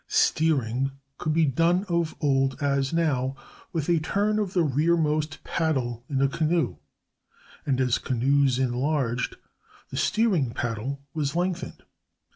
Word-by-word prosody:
Steering 135 -4 +1 0.3
could 155 - -1
be 160 +1 +3
done 165 +7 +2
of 170 -3 0
old, 135 -2 +1
as 140 -2 +1
now, 140 -6 0 0.4
with 160 -4 -2
a 170 -2 +3
turn 205 +6 0
of 200 -3 -2
the 175 - +3
rearmost 155 +1 +1
paddle 130 -8 -1
in 135 -2 +1
a - - +5
canoe, 160 +4 0 0.9
and 135 -2 +1
as 125 -2 +2
canoes 135 +1 +2
enlarged, 130 -1 0 0.6
the - - -5
steering 195 - +2
paddle 120 +4 -3
was 150 -2 -2
lengthened. 180 +1 -2
145 Hz, 130 wpm, -26 LUFS, 130-165 Hz, 0.9 s, a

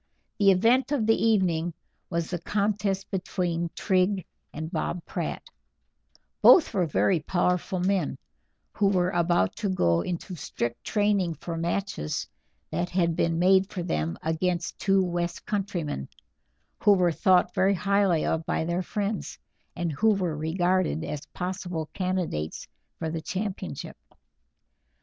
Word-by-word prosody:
The 200 -1 +6
event 230 +9 +4
of 270 -7 +1
the 225 +1 +3
evening 175 -7 +2 0.3
was 170 -1 -2
the 175 - -2
contest 200 0 -1
between 175 -3 -1
Tring 185 0 +1 0.3
and 160 +2 -6
Bob 170 0 -3
Pratt; - - -4 1.0
both 330 - +7
were 180 -3 +1
very 170 +3 +2
powerful 180 +3 0
men, 190 +1 0 0.6
who 205 - +2
were 180 -2 +2
about 175 - +2
to 205 - -1
go 85 - +2
into 180 - -4
strict 120 -7 -4
training 205 -5 +1
for 165 +3 -6
matches 170 - -2 0.4
that 175 +3 -1
had 170 -2 +1
been 165 0 +1
made 190 +2 +4
for 180 - -4
them 80 - -2
against 170 +2 -1
two 195 -1 +3
west 175 -1 -3
countrymen, 175 - -3 0.7
who 205 - +6
were 180 -3 +3
thought 180 +2 +3
very 195 +1 +3
highly 195 -3 +2
of 160 - 0
by 160 - 0
their 170 +2 0
friends, 205 +2 -3 0.4
and 175 -2 -2
who 215 +8 +3
were 180 -5 -1
regarded 175 +2 0
as 150 -3 -5
possible 180 -3 -4
candidates 180 - -2 0.3
for 160 -1 -3
the 165 0 -3
championship. 195 +4 -5
180 Hz, 135 wpm, -27 LUFS, 165-195 Hz, 1.0 s, both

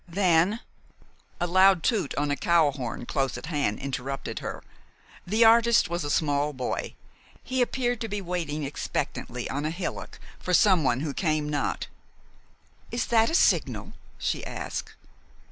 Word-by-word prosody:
"Then 180 +4 +2 0.4
" - - -28 0.3
A - - +1
loud 185 0 +5
toot 210 - 0
on 145 0 0
a - - +2
cowhorn 145 -8 +1
close 135 -2 -1
at - - -7
hand 145 -10 -1
interrupted 135 0 -4
her. - - -6 0.6
The 220 +5 +4
artist 230 -1 +5
was 170 -2 -1
a 145 - -3
small 145 0 +1
boy. 130 -2 -3 0.5
He 260 0 -1
appeared 245 -1 0
to 225 - -2
be 205 -1 -3
waiting 170 -5 -3
expectantly 125 -3 -3
on 145 +2 -3
a 155 - 0
hillock 170 +3 -5 0.2
for 180 - +1
someone 155 - +4
who 150 -2 -3
came 155 -1 0
not. 145 -2 -1 1.0
"Is 235 - -1
that 225 0 +5
a 325 - 0
signal?" - - +2 0.2
she - - -2
asked. - - -5
165 Hz, 150 wpm, -27 LUFS, 145-200 Hz, 1.0 s, loud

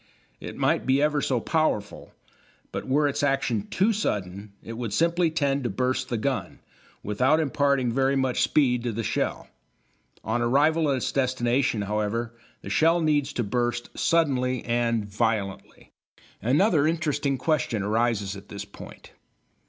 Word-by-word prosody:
It - - -8
might - - +1
be 135 +1 +3
ever 150 0 +2
so 130 -3 0
powerful, 135 -8 -1 0.6
but - - -5
were 145 +3 +2
its 145 +1 -2
action 135 -7 0
too 210 +4 +2
sudden 100 - -3
it 115 - -7
would 115 -3 -4
simply 170 +5 +2
tend 140 -3 0
to 120 - -1
burst 130 +4 -1
the 120 - -1
gun, 130 +4 -2 0.5
without 130 +9 +2
imparting 140 -4 +1
very 135 +1 +2
much 130 -2 0
speed 125 -5 +2
to 120 0 -2
the 115 +2 -3
shell. - - -2 0.8
On 110 +3 -1
arrival 150 +6 +3
at 135 - +1
its 125 - -2
destination, 125 -3 0
however, 105 +3 -2 0.3
the - - -7
shell 165 - +3
needs 145 -3 +1
to 120 - -1
burst 120 +2 -2
suddenly 130 -7 +1
and 115 -2 0
violently. 105 -2 -3 0.5
Another 150 - +3
interesting 150 -4 0
question 130 -9 0
arises 105 -2 0
at 100 +1 -12
this 100 - -6
point. - - -13
130 Hz, 150 wpm, -25 LUFS, 115-145 Hz, 0.8 s, be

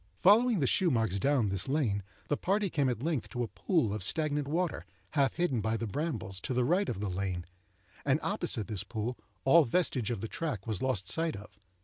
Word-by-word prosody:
Following 220 0 +5
the - - +3
shoe 180 +7 +3
marks 110 - +1
down 135 -3 +2
this 95 +3 -1
lane, 130 -8 +1 0.3
the 145 - +1
party 195 +3 0
came 140 -4 +2
at 120 0 -3
length 155 -6 -1
to 120 -1 -2
a - - -2
pool 150 - 0
of 105 - -3
stagnant 150 - +1
water, 170 +3 -1 0.3
half 140 -3 +2
hidden 150 -10 +1
by 110 +2 0
the 115 - -3
brambles, 105 - -3
to 130 - -3
the 125 0 +2
right 185 +8 +2
of - - -3
the 105 - -1
lane, 90 -2 -3 0.6
and 140 +1 +2
opposite 175 - 0
this 105 -4 -3
pool 110 +4 -3 0.3
all 165 +5 +7
vestige 130 - 0
of 115 -5 -3
the 115 - -3
track 130 - -4
was 110 -5 -2
lost 115 -8 0
sight 165 -1 0
of. 100 -1 -11
130 Hz, 215 wpm, -31 LUFS, 105-160 Hz, 0.6 s, all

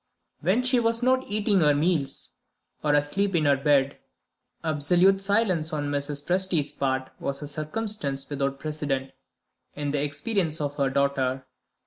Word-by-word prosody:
When 195 +10 +1
she 250 0 +4
was 230 +1 +1
not 260 +1 +2
eating 205 -1 +1
her 150 -3 +4
meals 150 -2 -1 0.5
or 150 -1 +3
asleep 180 +7 +1
in 155 -3 +2
her 140 -1 +5
bed, 140 0 +2 0.6
absolute 175 +5 +3
silence 195 -6 +1
on 145 -2 -2
Mrs. 145 0 -3
Presty's 180 -5 +1
part 130 -2 -2
was 140 +1 -4
a - - -5
circumstance 155 -1 -2
without 140 -1 -2
precedent 145 -3 -3 0.6
in 145 -1 -2
the 145 -1 0
experience 160 +3 -1
of 145 -1 -3
her 140 -2 +1
daughter. 135 -1 0
150 Hz, 145 wpm, -26 LUFS, 140-190 Hz, 0.6 s, her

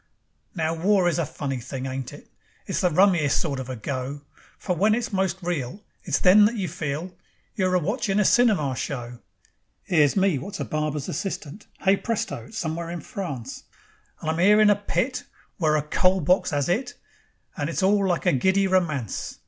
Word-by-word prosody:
Now 160 -1 0
war 185 +2 +2
is 175 - +1
a 165 - 0
funny 135 -2 -4
thing, 130 +2 -6
ain't 130 -1 -4
it? - - -13 0.4
It's - - -2
the 180 - +3
rummiest 175 -4 +3
sort 140 -5 -2
of 130 -1 -6
a 130 - -4
go. 130 +4 -4 0.4
For 180 - -2
when 210 +5 +3
it's 235 -2 -3
most 190 -2 0
real, 170 +1 -3 0.2
It's 150 -5 0
then 200 +3 +6
that 225 +3 +1
you 195 -5 -2
feel 160 +2 -4 0.4
You're 185 -4 +1
a - - +4
watchin' 205 - -1
a 210 - +3
cinema 195 - +3
show. 120 -3 -5 0.7
'Ere's 150 -5 +4
me 190 -7 +2
wot's 195 +9 -7
a - - -2
barber's 150 -2 -2
assistant. 185 +1 -5
Hey, 195 +1 +4
presto! 230 +1 -3
It's 220 - -10
somewheres 170 -1 -3
in 175 - -5
France, 175 - -6 0.6
And 155 - -1
I'm 160 - -3
'ere 205 +4 +6
in 210 -1 +6
a - - +4
pit 230 +5 -2 0.3
Where 155 -4 +2
a 150 - +1
coal 185 +5 +2
box 180 +3 +2
'as 145 -2 0
'it, 245 +7 -1 0.6
And 145 +1 -2
it's 165 - -2
all 200 +1 +3
like 175 -3 -1
a - - +4
giddy 190 +9 +2
romance. 160 - -1
175 Hz, 190 wpm, -24 LUFS, 145-195 Hz, 0.7 s, then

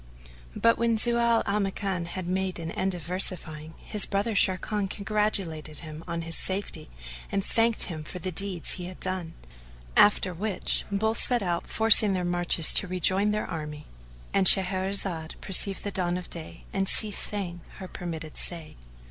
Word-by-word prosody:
But, 230 - +2
when 230 -1 +1
Zau 235 0 +1
al 205 +1 -1
Makan 195 -2 -3
had 185 +1 -6
made 185 +1 -3
an 165 -1 -6
end 190 -1 -2
of 175 - -8
versifying, 160 -3 -2
his 210 -2 +4
brother 205 +3 -2
Sharrkan 195 +1 +1
congratulated 195 -8 -2
him 155 +1 -10
on 170 -1 -4
his 165 0 -3
safety 190 - -6 0.4
and 195 -1 -2
thanked 230 0 +1
him 160 -4 -5
for 165 - -9
the 185 +1 -5
deeds 185 -1 +1
he 180 - -1
had 185 0 -10
done; 185 -3 -4 0.6
after 200 -3 +3
which 200 +3 -1
both 220 +3 +3
set 245 -4 +4
out 175 -2 -3
forcing 220 -2 +6
their 180 -1 -2
marches 175 -2 +5
to 200 - +5
rejoin 185 +3 0
their 210 0 -2
army.—And 150 - -5
Shahrazad 190 -3 +3
perceived 195 0 0
the 205 - -3
dawn 180 -2 -1
of 180 - -8
day 165 -2 -7
and 195 0 -1
ceased 210 -2 +3
saying 180 -4 -3
her 190 - -9
permitted 165 -4 -8
say. 165 -3 -4
185 Hz, 165 wpm, -26 LUFS, 170-200 Hz, 0.6 s, forcing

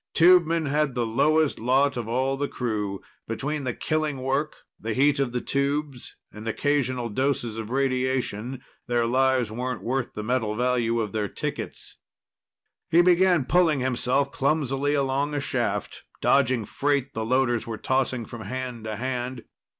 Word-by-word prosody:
Tubemen 170 -2 +5
had 145 -1 0
the 120 -1 0
lowest 145 +6 +2
lot 130 +4 +2
of 120 -3 -4
all 130 +3 0
the 140 +1 -2
crew. 105 -7 -3 0.3
Between 140 +5 -3
the 125 - -1
killing 155 -4 -1
work, 135 +3 0 0.2
the 110 0 -3
heat 140 +2 +3
of 135 -3 0
the 125 0 -2
tubes, 140 -1 -2 0.2
and 105 +1 -8
occasional 130 -1 0
doses 120 -1 -1
of 110 -1 -5
radiation, 130 -2 -1 0.2
their 120 -1 +1
lives 130 -1 +2
weren't 125 +2 -4
worth 130 +1 -2
the 105 - -4
metal 110 -2 0
value 120 -1 +1
of 105 -2 -3
their 105 -1 -1
tickets. - - -6 0.9
He 170 +2 +5
began 180 -4 +4
pulling 165 -2 +3
himself 130 +2 +1
clumsily 140 0 0
along 140 +1 0
a - - +1
shaft, 135 - -2 0.2
dodging 120 -3 +3
freight 140 +1 0
the 110 - -2
loaders 120 0 +1
were 115 -1 -4
tossing 130 -2 0
from 120 0 -9
hand 125 +1 -5
to 110 -1 -3
hand. 125 0 -3
130 Hz, 155 wpm, -25 LUFS, 120-140 Hz, 0.9 s, Tubemen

